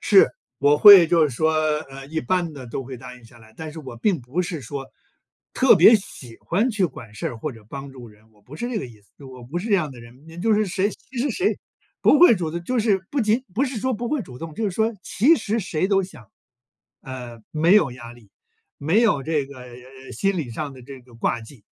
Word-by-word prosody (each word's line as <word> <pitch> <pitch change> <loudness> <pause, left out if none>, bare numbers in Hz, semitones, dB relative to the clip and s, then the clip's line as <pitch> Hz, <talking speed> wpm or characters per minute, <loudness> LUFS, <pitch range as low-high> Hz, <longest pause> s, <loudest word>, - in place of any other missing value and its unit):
是。 - - +5 0.3
我 145 +1 +3
会 195 -4 +10
就 165 -2 +4
是 125 - -8
说， 160 +5 +1 0.4
呃， 135 0 -10
一 160 +2 -3
般 170 +4 -1
的 130 -4 -10
都 130 +3 -5
会 130 0 -8
答 125 +1 -11
应 125 - -18
下 115 +1 -17
来， 110 0 -18
但 160 -1 -7
是 160 - -8
我 130 -5 -9
并 165 - 0
不 130 +9 -3
是 175 -3 -4
说 135 +2 -7 0.7
特 260 -2 +5
别 205 +5 +7
喜 125 - -11
欢 215 +9 0
去 200 -4 +1
管 115 -9 -12
事 105 - -4
儿 120 - -5
或 150 +7 -4
者 115 -4 -14
帮 140 +2 -8
助 125 -3 -12
人， 110 +1 -20
我 105 -1 -27
不 130 +8 -14
是 240 +9 -4
这 235 -4 -2
个 - - -5
意 115 -4 -16
思， 100 - -31
就 140 - -12
我 130 -2 -12
不 145 +9 -5
是 200 +6 -5
这 210 - +3
样 155 -7 0
的 125 - -12
人。 120 +4 -15
你 165 +1 -13
就 220 +4 +2
是 215 - +2
谁 195 +1 0
其 255 +4 -11
实 275 +4 0
谁 370 - 0 0.4
不 - - +5
会 295 -11 +8
主 170 -3 -3
动 170 0 -4
就 250 +7 -2
是， 205 -4 +1
不 280 - -1
仅 225 +4 +1
不 255 +9 +1
是 260 -3 -4
说 260 +3 0
不 235 +2 -4
会 295 -1 -1
主 125 -9 -12
动， 160 0 -8
就 225 - -5
是 205 - 0
说 220 +4 0
其 280 - +3
实 220 -6 -2
谁 185 -3 -2
都 195 -1 +3
想， 155 - -10 0.7
呃， 125 -3 -9
没 165 +4 +3
有 160 -11 +4
压 120 -1 -10
力， 115 -4 -19 0.5
没 165 +10 +2
有 210 - +2
这 150 -3 -1
个， 140 -1 -12
呃， 125 +2 -13
心 195 -2 -1
理 140 -7 -4
上 145 +3 -5
的 130 - -13
这 135 +1 -11
个 125 -1 -20
挂 115 0 -1
记。 110 -1 -15
155 Hz, 275 characters per minute, -22 LUFS, 125-200 Hz, 0.7 s, 会